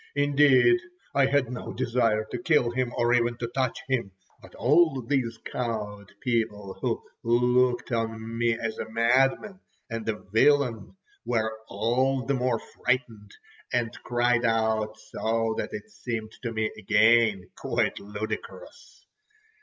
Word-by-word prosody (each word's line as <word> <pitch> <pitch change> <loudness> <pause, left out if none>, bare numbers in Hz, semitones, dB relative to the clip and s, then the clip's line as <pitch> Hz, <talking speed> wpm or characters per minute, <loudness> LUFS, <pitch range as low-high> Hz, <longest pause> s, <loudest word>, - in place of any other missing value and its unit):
Indeed, 145 - +5 0.3
I 140 -1 +4
had 135 -3 +1
no 125 - -6
desire 115 -3 +1
to 125 - -3
kill 135 -5 +3
him, 125 0 -1
or 120 0 +2
even 120 -1 +2
to 120 - -3
touch 130 0 -2
him; 120 -8 -1 0.3
but - - -15
all 155 0 +3
these 120 -3 -1
cowed 105 -4 -4
people 105 -5 -1
who - - -1 0.2
looked 125 +2 +2
on 115 -1 -3
me 115 0 +1
as 115 -1 -4
a 110 - -5
madman 130 - +2 0.3
and 115 -1 -3
a 110 - 0
villain, 120 - +2 0.3
were 110 -2 -1
all 125 +5 0
the 140 - 0
more 125 -2 +1
frightened, 115 -5 -3 0.4
and 120 -2 0
cried 120 0 +1
out 110 -2 +1
so 115 +1 -1
that - - -2
it 105 0 -8
seemed 110 +1 -5
to 115 - -3
me 110 -1 -1
again 110 -2 +3
quite - - -1
ludicrous. 105 - -7
115 Hz, 140 wpm, -27 LUFS, 110-125 Hz, 0.4 s, Indeed